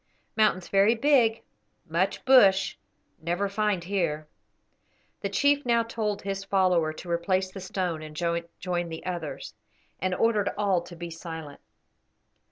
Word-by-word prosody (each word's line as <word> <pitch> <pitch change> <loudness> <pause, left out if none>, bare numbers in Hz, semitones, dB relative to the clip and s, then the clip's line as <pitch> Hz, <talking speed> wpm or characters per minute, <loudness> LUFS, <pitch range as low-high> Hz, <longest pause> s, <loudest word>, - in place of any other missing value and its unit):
Mountains 210 -5 +2
very 200 +4 +4
big, 235 -3 +3 0.4
much 170 +4 -1
bush; 200 -8 +5 0.5
never 175 +5 -1
find 200 -3 0
here." 170 -5 -1 0.9
The - - -3
chief 285 0 +2
now 235 -1 +2
told 215 -3 -3
his 195 0 -3
follower 185 -5 +2
to 170 +2 -8
replace 185 +2 0
the 195 - -8
stone 180 -3 -3
and 155 -1 -9
join 170 +1 -2
the 160 0 -7
others, 175 -5 -5 0.5
and 185 -1 0
ordered 215 -2 +2
all 195 -4 +2
to 175 0 -11
be 170 0 -7
silent. 160 -3 -8
185 Hz, 135 wpm, -27 LUFS, 170-210 Hz, 0.9 s, bush